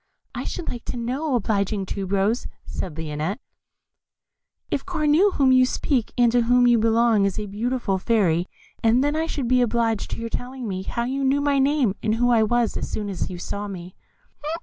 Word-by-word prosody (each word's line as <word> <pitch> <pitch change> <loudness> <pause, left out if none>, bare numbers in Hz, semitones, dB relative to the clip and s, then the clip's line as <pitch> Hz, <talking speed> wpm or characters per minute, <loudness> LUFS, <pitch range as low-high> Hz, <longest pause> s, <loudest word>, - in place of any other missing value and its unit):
"I - - -5
should 345 - -5
like 240 - -5
to - - -4
know, 260 +5 -1
obliging 200 -3 0
Tube 195 0 -5
rose," 200 +4 +1 0.2
said 165 -5 -5
Lionette, 160 +5 -3 1.3
"if 275 - -1
Cornue, 325 +1 +3
of 395 - -1
whom 270 -2 +4
you 255 0 +6
speak, 250 -2 0
and 240 -1 +4
to 245 0 +3
whom 245 +1 +4
you 240 -1 +5
belong, 225 -2 +3
is 195 - -1
a 210 - -3
beautiful 210 -1 -2
fairy; 185 -6 +1 0.3
and 230 +3 +3
then 290 +1 0
I 320 +1 0
should 275 -6 -3
be 250 +1 +3
obliged 230 -2 0
by - - -7
your 230 - -4
telling 250 +1 -5
me 190 -2 -3
how 235 +5 -3
you 270 +3 -2
knew 270 +1 +2
my 285 -1 +2
name 270 -6 +2
and 220 0 +1
who 245 +1 +2
I 230 -2 +4
was 235 +1 +1
as - - -4
soon 210 -1 -3
as 190 - -3
you 180 - -6
saw 200 +3 -5
me." 180 -2 -8
235 Hz, 205 wpm, -23 LUFS, 200-255 Hz, 1.3 s, you